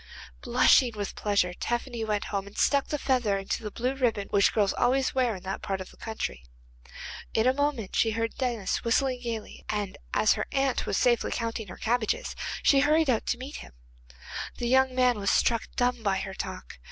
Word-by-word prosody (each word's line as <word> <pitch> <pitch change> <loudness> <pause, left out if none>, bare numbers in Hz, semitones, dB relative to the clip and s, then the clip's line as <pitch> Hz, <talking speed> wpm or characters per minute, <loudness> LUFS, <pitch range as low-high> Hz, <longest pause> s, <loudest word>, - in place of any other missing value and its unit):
Blushing 245 -3 +4
with 205 -2 -4
pleasure 200 -4 +1
Tephany 240 +3 -3
went 210 -2 -1
home 200 0 -2
and 200 - -13
stuck 280 -2 +3
the 300 - -2
feather 250 -8 +1
into 195 +3 -3
the 215 - -4
blue 250 +5 -2
ribbon 235 -7 0
which 200 -1 +4
girls 205 -3 +2
always 260 +2 +1
wear 250 -4 +1
in 185 - -10
that 190 0 -4
part 195 -1 -2
of 185 - -8
the - - -19
country. 220 - -5 0.9
In 220 - +3
a 255 - +4
moment 280 -7 -1
she 225 - +3
heard 225 +1 -1
Denis 240 -6 -2
whistling 250 +2 +1
gaily, 230 -3 -5
and 205 -2 -3
as 215 - +4
her - - -3
aunt 270 -1 0
was - - 0
safely 240 -2 +2
counting 230 -2 -3
her 180 - -9
cabbages, 230 -1 -1 0.3
she 275 - +5
hurried 305 0 +4
out 225 - -1
to 245 - 0
meet 265 +4 -7
him. - - -11 0.8
The 240 - -2
young 260 +1 +3
man 250 -3 +3
was 200 -1 0
struck 230 -1 +2
dumb 245 -1 +1
by 200 -3 +1
her 195 0 -4
talk. 60 - -7
230 Hz, 200 wpm, -28 LUFS, 205-255 Hz, 0.9 s, she